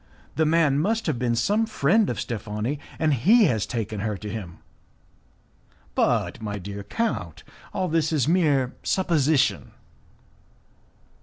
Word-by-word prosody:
The 160 -1 +2
man 155 -3 +3
must 220 +7 0
have 150 -8 -1
been 120 -2 0
some 205 - +1
friend 210 +2 +2
of - - -3
Steffani, 110 +4 -3 0.2
and 155 -2 +2
he 210 - +5
has 110 - 0
taken 110 -3 -3
her 105 0 -2
to 105 +2 -7
him." 95 -7 -7 1.4
"But, - - 0
my 105 -1 -4
dear 100 +1 -7
count, 100 - -3 0.3
all 185 - -1
this 160 -1 +1
is 145 -4 +1
mere 150 -7 +2
supposition." 155 -6 +1
140 Hz, 135 wpm, -24 LUFS, 110-165 Hz, 1.4 s, he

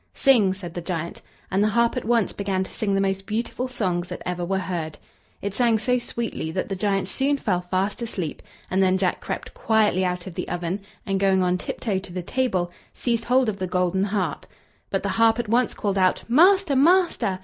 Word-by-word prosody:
"Sing!" 235 -9 +4
said 185 -3 -7
the 175 - -4
giant; 170 -1 -4 0.3
and 195 +2 +2
the - - +3
harp 235 +2 +2
at - - -3
once 230 -2 +2
began 195 -2 -1
to - - -8
sing 200 -2 -1
the - - +2
most 195 0 -1
beautiful 235 +3 -2
songs 185 -8 -1
that - - -7
ever 180 0 -2
were 190 +2 0
heard. 170 -5 -3 0.5
It 200 -1 -2
sang 230 0 +3
so 250 +3 +1
sweetly 235 -8 -4
that 185 - -2
the 195 - -2
giant 195 -1 0
soon 275 +8 +1
fell 185 -9 0
fast 185 +4 -1
asleep; 185 -9 -4 0.3
and 190 +1 +2
then 190 0 +3
Jack 185 -1 0
crept - - -5
quietly 215 -4 +2
out 180 -1 -2
of 190 - -7
the - - -4
oven, 175 +3 -2 0.2
and 195 -1 0
going 190 -1 +3
on 180 0 +1
tiptoe 200 -1 -2
to 190 -1 -11
the 180 0 -4
table, 185 -6 0 0.2
seized 235 -2 -1
hold 255 0 +3
of 205 -2 -2
the 185 - -2
golden 180 +1 +1
harp. 200 -2 -2 0.4
But - - -1
the - - -1
harp 225 0 +4
at 240 -3 -3
once 240 +1 +2
called 200 -2 -1
out: 185 -1 +2
"Master! 350 - +5
master!" 320 - +3
195 Hz, 215 wpm, -24 LUFS, 185-230 Hz, 0.5 s, Master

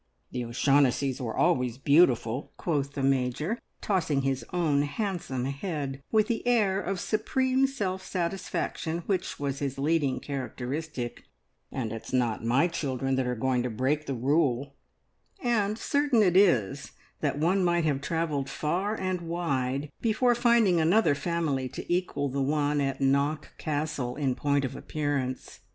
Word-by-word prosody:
"The 125 - -3
O'Shaughnessys 135 +1 +2
were 115 -3 -4
always 125 -9 +2
beautiful," 135 -4 +3
quoth 140 -4 -1
the 140 - -3
Major, 135 - 0 0.2
tossing 160 -9 +1
his 135 -1 0
own 160 -5 +2
handsome 145 - -2
head 140 -1 -4
with 215 -1 +4
the 235 -2 -1
air 205 -5 +3
of 190 0 -3
supreme 260 +7 +1
self 190 -8 -3
satisfaction 175 -2 -3
which 195 -3 -2
was 140 -1 -2
his 135 -2 -3
leading 145 -1 +1
characteristic, 135 0 -5 0.5
"and 115 -4 -3
it's 115 +2 -7
not 120 -4 0
my 125 +9 +3
children 135 -5 -2
that 130 -1 0
are 125 - -1
going 125 +1 +1
to 125 - -2
break 135 +7 -1
the 135 - -2
rule," 135 +1 +1 0.7
and 215 - +1
certain 285 -4 +2
it 180 -3 +3
is 150 - +3 0.3
that - - -1
one 180 +5 +2
might 175 -1 +2
have 140 -3 0
travelled 150 -4 -1
far 185 +10 -1
and 185 -1 -1
wide 145 -5 -2
before 235 +2 +3
finding 235 -7 +4
another 175 +2 +4
family 145 -5 -1
to 175 - -4
equal 175 -5 0
the 135 +1 -2
one 145 +1 +1
at 135 -1 -2
Knock 140 +3 +1
Castle 150 -4 -2
in 140 -3 0
point 140 +1 +1
of 130 +1 -5
appearance. 145 -4 -3
145 Hz, 150 wpm, -28 LUFS, 135-180 Hz, 0.7 s, with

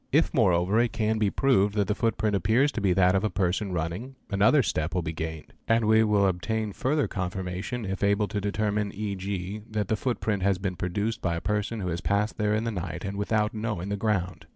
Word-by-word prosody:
If - - +3
moreover 90 +4 +3
it 120 -2 +1
can 110 -1 0
be 105 -2 +2
proved 105 -5 +2
that 105 -1 +2
the 105 - +1
footprint 110 -1 0
appears 115 +9 +3
to 115 - -4
be 100 -2 +2
that 90 0 +4
of 95 +1 +1
a 110 - +1
person 95 +1 -1
running, 90 +10 -3 0.2
another 105 +8 +4
step 80 -2 -1
will 90 - 0
be 80 - -3
gained; 80 -1 -6
and 115 0 +3
we 110 +1 +5
will: 105 -2 +3
obtain 105 +3 -1
further 145 +6 0
confirmation 95 +5 -4
if 95 0 -4
able 100 +1 +2
to 105 -1 -2
determine, 105 0 -1
e.g., 100 -1 -4
that 105 -3 -2
the 110 - +2
footprint 110 -4 -1
has 100 0 +2
been 95 -1 -3
produced 100 +6 -2
by 85 -2 0
a - - -2
person 105 +4 -2
who 90 - -2
has 85 +1 -3
passed 105 +3 0
there 105 0 +2
in 110 - 0
the 115 - -1
night 90 -1 -5
and 100 0 -4
without 105 +2 0
knowing 105 -4 -3
the 100 - 0
ground. 95 -4 -2
100 Hz, 225 wpm, -27 LUFS, 95-110 Hz, 0.2 s, we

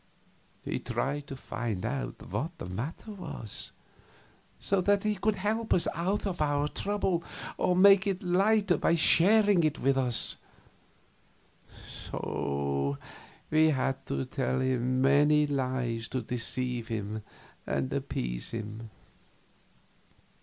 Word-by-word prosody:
He - - -2
tried 145 +1 -2
to 135 - -6
find 115 -5 -4
out 135 +4 -4
what 165 +3 -3
the - - -6
matter 120 - -5
was, 180 - -5 0.9
so 195 -1 +1
that 200 +2 +2
he 215 0 +1
could 210 +2 0
help 215 +4 0
us 175 - +2
out 185 +6 -1
of 185 -5 -3
our 145 -1 +1
trouble 190 -1 -1 0.3
or 180 - +1
make 195 +1 +6
it 195 -1 -1
lighter 195 +2 +3
by 170 - +2
sharing 195 +3 +6
it 155 -1 +1
with 135 0 +2
us; 125 -3 +2 1.5
so 70 0 -2 0.5
we 155 +1 +5
had 135 -3 0
to 130 - -2
tell 130 0 -1
many 130 +4 +3
lies 130 -5 -2
to 130 -2 -3
deceive 125 0 -2
him 110 -1 -4 0.5
and 65 -1 -1
appease - - -3
him. 110 0 -6
140 Hz, 120 wpm, -29 LUFS, 120-185 Hz, 1.5 s, make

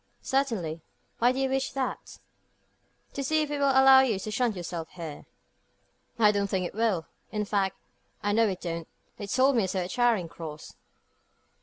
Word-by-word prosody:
"Certainly. 220 - -1 0.4
Why 240 +2 +4
do 255 - -4
you 270 0 +1
wish 265 0 -1
that?" 270 -1 -4 1.0
"To 275 - -3
see 310 +3 +2
if 295 - -5
it 290 - -2
will 280 -1 +3
allow 265 0 +7
you 250 -6 +2
to 215 +3 -5
shunt 230 0 0
yourself 170 -2 -5
here." 165 -5 -8 0.9
"I 215 -2 +5
don't 200 -1 0
think 190 -2 -1
it - - -5
will. 210 -6 0 0.3
In 210 -1 -2
fact, 195 -2 0 0.5
I 205 - +1
know 225 +2 +4
it 190 -3 -3
don't. 165 -1 -4 0.3
They 205 - -6
told 265 +6 +3
me 215 -5 +2
so 185 0 -1
at 180 - -6
Charing 235 -8 +2
Cross." 160 -2 -9
210 Hz, 180 wpm, -28 LUFS, 180-265 Hz, 1.0 s, allow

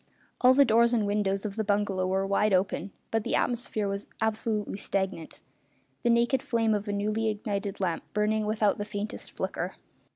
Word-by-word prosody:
All 255 +1 +7
the 280 +1 +7
doors 235 +1 +4
and 220 -3 +1
windows 200 -1 0
of 205 0 -4
the 220 - +1
bungalow 200 -2 0
were 190 +1 +1
wide 200 +1 +3
open, 190 0 0 0.2
but 225 -1 +1
the - - 0
atmosphere 235 -4 0
was 200 +1 -4
absolutely 220 -2 -1
stagnant, 190 -5 -3 0.6
the 240 - +1
naked 235 +2 +3
flame 230 -5 +1
of 205 0 -2
a - - -1
newly 215 +2 0
ignited 205 -1 -3
lamp 175 -4 -1
burning 210 +1 +1
without 210 -1 +1
the - - -1
faintest 210 0 -5
flicker. - - -3
210 Hz, 175 wpm, -28 LUFS, 200-225 Hz, 0.6 s, All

